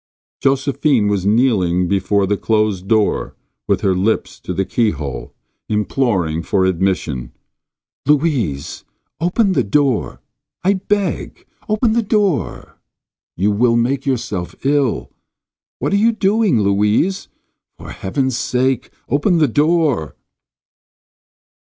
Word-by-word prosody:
Josephine 135 -4 +2
was 100 -2 0
kneeling 100 -6 +2
before 100 +1 +1
the 105 +2 0
closed 105 -3 0
door 110 -1 +1 0.3
with - - +1
her 95 - +2
lips 95 +5 -1
to - - -6
the 95 - -1
keyhole, 75 - -2 0.4
imploring 105 -7 0
for 95 +2 +1
admission. 85 -9 -1 0.7
"Louise, 135 - 0 0.4
open 185 +5 +1
the - - +2
door! 130 +2 0 0.4
I 195 +2 +3
beg, 200 +1 -2 0.2
open 215 +1 +2
the 235 - +2
door 205 - -1 0.3
— - - -68
you 100 +4 +2
will 115 +3 +2
make 130 +4 0
yourself 115 -9 -2
ill. 140 -4 +1 0.7
What - - -2
are - - +4
you 225 +3 +4
doing, 205 - +2
Louise? 105 - +1 0.5
For - - -10
heaven's 130 +6 -2
sake 130 0 0 0.2
open 170 +6 +2
the 155 -2 +4
door." 145 - +1
120 Hz, 115 wpm, -18 LUFS, 95-150 Hz, 0.7 s, are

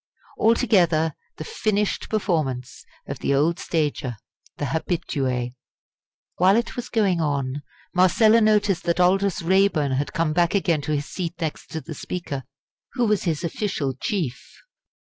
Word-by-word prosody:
Altogether, 175 - +3 0.2
the - - -5
finished 210 +4 -1
performance 150 - -2 0.2
of - - -6
the 140 - +1
old 165 +6 +2
stager, 145 -7 -1 0.4
the 145 - -2
habitué. 135 -5 -2 0.8
While 185 +3 +5
it 235 +1 -1
was 245 - -5
going 195 -7 +2
on, 140 -2 -1 0.3
Marcella 215 +5 +5
noticed 210 -4 +3
that 170 0 +1
Aldous 190 0 +2
Raeburn 185 -5 +3
had 135 +2 -1
come 165 -2 0
back 170 +3 +2
again 170 -6 +2
to 155 +1 -2
his 145 0 -2
seat 170 +3 -4
next 160 -3 -4
to 160 - -5
the 160 - -8
Speaker, 145 -5 -5 0.5
who 245 -3 +1
was 210 -3 +1
his 160 -2 -1
official 170 -6 -2
chief. 140 - -4
170 Hz, 145 wpm, -24 LUFS, 145-195 Hz, 0.8 s, While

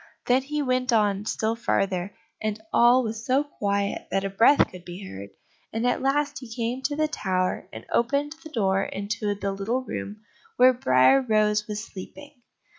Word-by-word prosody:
Then 250 +2 +3
he 295 +2 -2
went 255 -1 0
on 205 -3 +2
still 220 +1 0
farther, 195 -5 -1 0.3
and 215 0 -2
all 245 +2 +5
was 220 -1 -4
so 260 +4 +2
quiet 200 -8 -2
that 195 - 0
a 195 - -3
breath 230 +8 +5
could 180 -1 -11
be 180 +3 -8
heard, 100 - -8 0.4
and 225 +2 -2
at 245 - +1
last 285 +1 0
he 250 -4 -11
came 235 +2 -3
to 290 +1 0
the 310 +1 +1
tower, 185 - -2
and - - -9
opened 280 +5 +1
the 315 - -9
door 195 -8 +1
into 205 +1 -3
the 200 0 -3
little 215 +7 -2
room 210 -3 -6 0.3
where 255 +1 +7
Briar 130 - +4
rose 215 -3 +1
was 210 0 -4
sleeping. 280 +10 -10
220 Hz, 180 wpm, -25 LUFS, 200-255 Hz, 0.4 s, where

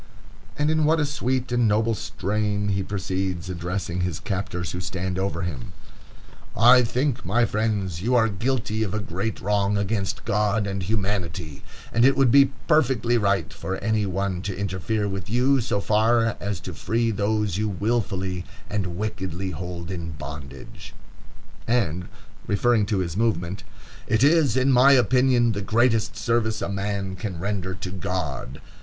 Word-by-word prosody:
And 150 +1 +2
in 155 0 +2
what 160 +2 +3
a 150 - +2
sweet 130 -3 -1
and 120 -2 +3
noble 110 +2 +2
strain 105 -1 -1
he 100 -1 0
proceeds, 95 -2 -3
addressing 90 +1 -3
his 90 -3 -2
captors, 95 -4 -3
who 90 - -4
stand 95 0 -3
over 95 -2 -2
him: 80 -8 -5 0.8
"I 125 +4 +7
think, 125 +2 -1
my 115 +7 +2
friends, 105 -6 -1
you 120 +5 +1
are 115 -2 +5
guilty 110 +1 -1
of 105 -2 -1
a - - 0
great 100 +3 -3
wrong 100 +1 +1
against 100 -1 -2
God 105 -1 +1
and 100 -1 -3
humanity, 95 -6 -2 0.3
and 115 - +3
it 135 +2 +5
would 135 -3 +4
be 140 +1 +8 0.2
perfectly 130 -6 +3
right 100 -4 0
for 95 0 -4
any 110 -1 0
one 95 -1 -2
to 95 -1 -4
interfere 100 +2 -1
with 95 -1 -5
you 130 +4 +3
so 110 -3 -1
far 115 +2 +2
as 100 -3 -3
to 90 - -7
free 115 +8 0
those 105 -2 0
you 105 0 0
willfully 95 -3 -1 0.3
and 95 -5 -2
wickedly 95 -3 -3
hold 85 +1 -6
in 85 -3 -5
bondage." 70 -1 -9 0.7
And 90 -8 0 0.4
referring 110 0 +2
to 105 - 0
his 90 -3 -2
movement: 100 -3 -1 0.4
"It 110 +3 +2
is, 145 -5 +4
in 130 +1 +3
my 130 +2 +7
opinion, 125 -1 +4
the 100 -2 -3
greatest 115 +1 +1
service 110 -2 0
a - - -2
man 100 -1 -2
can 95 -5 -4
render 95 0 -3
to 90 0 -6
God." 90 -9 -4
100 Hz, 160 wpm, -24 LUFS, 95-115 Hz, 0.8 s, be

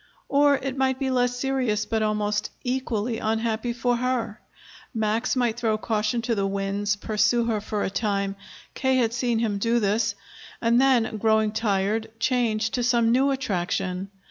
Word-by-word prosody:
Or, 285 0 +4
it 265 0 -4
might 265 -1 +1
be 265 -1 -1
less 245 -1 +1
serious 250 -6 0
but 220 -1 -1
almost 210 -1 0
equally 245 -3 -2
unhappy 225 +1 -1
for 245 0 0
her. 240 -3 -2 0.5
Max 220 +3 0
might 240 -2 0
throw 220 -3 +1
caution 215 +2 -1
to 235 - 0
the 200 -3 0
winds, 200 +1 -1
pursue 215 +3 +1
her 220 -3 -1
for 210 0 -3
a - - -2
time, 200 -2 -1 0.4
K. 265 -1 +1
had 235 -3 +2
seen 240 -1 0
him 215 -3 0
do 230 +3 +2
this, 210 0 +1 0.4
and 235 +2 +3
then, 245 -4 +2
growing 220 0 +2
tired, 210 0 0
change 225 -3 +1
to 250 - -1
some 235 -2 +3
new 265 +3 +3
attraction. 190 -6 -2
225 Hz, 165 wpm, -25 LUFS, 210-245 Hz, 0.5 s, Or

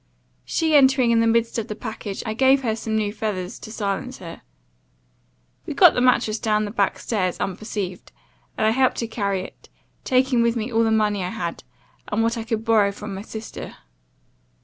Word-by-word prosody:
She 320 -2 0
entering 265 -3 +5
in 230 - +4
the 230 - +3
midst 230 0 +1
of 220 - -4
the 210 - -5
package, 210 -2 -6
I 220 - -2
gave 265 +3 +4
her 220 -3 0
some 220 -1 -3
new 210 -1 0
feathers, 205 -4 -4
to 215 - -9
silence 220 +4 -3
her. 170 -2 -10 1.3
We - - -4
got - - +7
the 245 - 0
mattrass 240 -3 +2
down 215 -1 +1
the 205 - -5
back 200 -3 0
stairs, 185 -6 -2
unperceived, 195 -1 -4 0.5
and - - +1
I 220 - +4
helped 260 +2 +2
to 230 - -2
carry 200 -4 -1
it, - - -12 0.3
taking 255 -1 +2
with 235 0 +2
me 230 +1 -3
all 225 +1 +3
the 225 - +2
money 210 -3 +1
I 180 - -2
had, 170 -2 -5 0.4
and 215 +2 0
what 230 +1 +1
I 230 - -4
could 225 0 -3
borrow 215 -3 +4
from 205 0 -7
my 190 - -5
sister. 220 +1 -8
220 Hz, 195 wpm, -23 LUFS, 205-235 Hz, 1.3 s, got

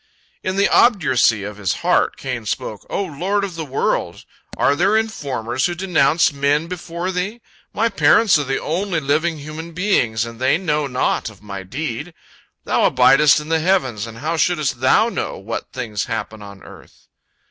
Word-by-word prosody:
In 185 - -2
the 200 +1 +3
obduracy 135 - +3
of 105 +1 -7
his 100 -3 -1
heart, - - +2
Cain 125 -5 -5
spake: 105 0 -3
"O 200 - -1
Lord 190 +5 -2
of 195 -2 -4
the 165 -1 -5
world! 135 -2 -2 0.3
Are 140 - +3
there 200 +8 +3
informers 135 - -2
who 175 - -4
denounce 170 -4 +2
men 140 +2 +1
before 175 +1 -5
Thee? 190 +6 -3 0.3
My 225 +2 +1
parents 195 -1 +4
are - - 0
the 135 -1 -2
only 175 +2 -1
living 155 +3 0
human 155 +3 -8
beings, 125 - +1
and 115 +1 -10
they 130 +4 +3
know 150 -5 -1
naught 125 -3 -1
of 105 -2 -17
my 100 -2 -6
deed. 150 - -5 0.5
Thou - - +2
abidest 150 +1 +5
in 150 +1 -8
the 165 0 +2
heavens, 135 - 0
and 115 0 -10
how 155 +6 -2
shouldst 155 -7 0
Thou 170 - +4
know - - -4
what 115 +4 -6
things 110 -5 -3
happen 110 -2 -5
on 100 -2 -11
earth?" - - -16
150 Hz, 175 wpm, -20 LUFS, 120-180 Hz, 0.5 s, abidest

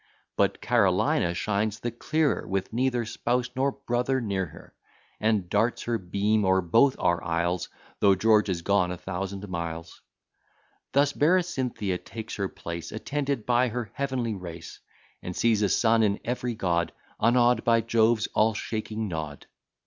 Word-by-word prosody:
But - - +1
Carolina 85 0 +2
shines 105 +2 -1
the 120 - -3
clearer 155 +5 0
With 95 +2 -2
neither 125 -1 +1
spouse 125 +2 -1
nor 135 +2 +1
brother 125 +2 -1
near 100 -6 -2
her: - - -15 0.5
And 105 -4 +1
darts 110 +6 +1
her 120 -1 -1
beams 100 +4 +1
o'er 95 0 +3
both 115 +10 +4
our 85 -1 +1
isles, 85 +1 -1 0.3
Though 100 -1 +5
George 105 +1 +3
is 85 -3 -2
gone 100 -2 +2
a 90 - -4
thousand 95 +2 -5
miles. 85 -2 -5 0.9
Thus 140 +1 +3
Berecynthia 135 - +1
takes 110 -1 -7
her 100 -2 -1
place, 85 0 -7
Attended 140 +1 -2
by 125 +1 +3
her 120 -3 -4
heavenly 130 -5 -2
race; 85 -4 -8 0.4
And 90 - -6
sees 115 -3 +2
a 100 - +2
son 115 +3 +3
in 105 -2 +2
every 125 0 -2
God, 85 -5 0 0.3
Unawed 120 +1 +3
by 115 -1 +4
Jove's 115 0 +2
all 110 0 +3
shaking 110 0 -3
nod. 80 -5 -5
110 Hz, 150 wpm, -27 LUFS, 95-120 Hz, 0.9 s, Though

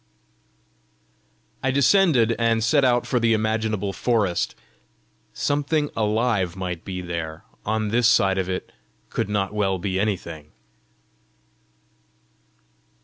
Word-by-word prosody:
I 135 - 0
descended, 140 - +4
and 115 -1 +2
set 140 +5 +3
out 120 -2 +3
for 125 0 0
the 115 -1 +3
imaginable 110 -2 -1
forest: 105 -6 0 0.8
something 145 +1 0
alive 105 -4 0
might 90 -3 -4
be 90 -1 -5
there; 80 -3 -5 0.2
on 110 0 0
this 120 +2 +3
side 95 -5 +3
of 95 -1 -2
it 90 - -4 0.4
could - - -2
not 100 -1 -1
well 100 -3 0
be 95 0 -2
anything! 85 -7 -3
110 Hz, 110 wpm, -23 LUFS, 95-120 Hz, 0.8 s, descended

